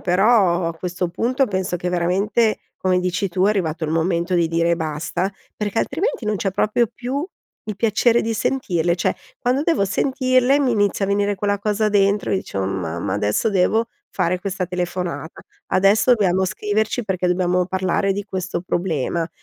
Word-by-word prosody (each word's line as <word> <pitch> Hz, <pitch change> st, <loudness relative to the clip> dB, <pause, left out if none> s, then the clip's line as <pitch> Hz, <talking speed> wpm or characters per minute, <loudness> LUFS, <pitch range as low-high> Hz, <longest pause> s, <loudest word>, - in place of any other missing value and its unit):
però 185 Hz, -2 st, +3 dB
a 165 Hz, -, -5 dB
questo 180 Hz, +1 st, -3 dB
punto 250 Hz, +9 st, 0 dB
penso 190 Hz, -4 st, -2 dB
che 180 Hz, +1 st, -3 dB
veramente, 195 Hz, +6 st, +1 dB, 0.2 s
come 185 Hz, -1 st, +1 dB
dici 180 Hz, +2 st, -1 dB
tu 185 Hz, +1 st, 0 dB
è 200 Hz, -, +4 dB
arrivato 170 Hz, -5 st, -1 dB
il 155 Hz, -, -2 dB
momento 170 Hz, +2 st, 0 dB
di 170 Hz, -2 st, +2 dB
dire 170 Hz, +1 st, +2 dB
basta, 165 Hz, +3 st, -2 dB, 0.3 s
perché 210 Hz, +1 st, -2 dB
altrimenti 330 Hz, -, -1 dB
non 210 Hz, -1 st, 0 dB
c'è 195 Hz, -, -1 dB
proprio 220 Hz, +5 st, +1 dB
più 270 Hz, +5 st, -3 dB, 0.4 s
il 215 Hz, -2 st, -5 dB
piacere 230 Hz, +3 st, +2 dB
di 225 Hz, -, -1 dB
sentirle, 175 Hz, -9 st, 0 dB
cioè, 175 Hz, -, 0 dB, 0.2 s
quando 255 Hz, +4 st, +1 dB
devo 325 Hz, -, +2 dB
sentirle 255 Hz, +4 st, +2 dB
mi 270 Hz, -4 st, +2 dB
inizia 205 Hz, -2 st, +1 dB
a -, -, -3 dB
venire 205 Hz, 0 st, +1 dB
quella 205 Hz, +1 st, 0 dB
cosa 210 Hz, +1 st, 0 dB
dentro 205 Hz, 0 st, +2 dB
e -, -, +3 dB
dicevo: 95 Hz, -, -3 dB
"Oh -, -, -1 dB
mamma, 85 Hz, -3 st, -3 dB
adesso 105 Hz, -, +1 dB
devo 215 Hz, +4 st, +2 dB, 0.2 s
fare 180 Hz, +2 st, 0 dB
questa 190 Hz, -1 st, -3 dB
telefonata, 180 Hz, -2 st, -4 dB, 0.3 s
adesso 200 Hz, +6 st, +4 dB
dobbiamo 190 Hz, -4 st, +2 dB
scriverci 210 Hz, +5 st, -1 dB
perché 185 Hz, -3 st, -1 dB
dobbiamo 180 Hz, 0 st, +1 dB
parlare 190 Hz, +1 st, 0 dB
di 200 Hz, +1 st, -4 dB
questo 185 Hz, -3 st, -4 dB
problema". 170 Hz, -2 st, -1 dB
190 Hz, 175 wpm, -21 LUFS, 175-215 Hz, 0.4 s, è